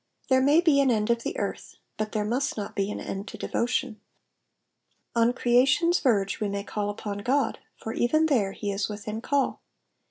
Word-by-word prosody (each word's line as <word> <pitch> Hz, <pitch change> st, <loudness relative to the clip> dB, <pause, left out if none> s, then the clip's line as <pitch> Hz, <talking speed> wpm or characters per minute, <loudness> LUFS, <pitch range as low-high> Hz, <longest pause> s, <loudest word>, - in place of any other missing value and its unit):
There 260 Hz, 0 st, +5 dB
may 290 Hz, +5 st, +5 dB
be 305 Hz, -5 st, +4 dB
an 270 Hz, -, +3 dB
end 220 Hz, -1 st, +2 dB
of 235 Hz, 0 st, +1 dB
the -, -, -4 dB
earth, -, -, -4 dB, 0.2 s
but 215 Hz, 0 st, -3 dB
there 210 Hz, -2 st, -1 dB
must 250 Hz, +5 st, -1 dB
not 205 Hz, -, -5 dB
be 195 Hz, 0 st, 0 dB
an -, -, -4 dB
end 195 Hz, +2 st, -5 dB
to -, -, -8 dB
devotion. 240 Hz, -1 st, -2 dB, 1.1 s
On 230 Hz, +1 st, +4 dB
creation's 260 Hz, +8 st, +3 dB
verge 200 Hz, -7 st, +1 dB
we 210 Hz, -2 st, -1 dB
may 200 Hz, 0 st, -3 dB
call 205 Hz, 0 st, -3 dB
upon 205 Hz, -1 st, -5 dB
God, 265 Hz, +6 st, 0 dB, 0.2 s
for 225 Hz, -, -5 dB
even 310 Hz, +7 st, +2 dB
there 225 Hz, -11 st, +1 dB
he 205 Hz, 0 st, -3 dB
is 200 Hz, +1 st, -2 dB
within 210 Hz, +1 st, -5 dB
call. 280 Hz, +2 st, 0 dB
230 Hz, 190 wpm, -26 LUFS, 205-265 Hz, 1.1 s, There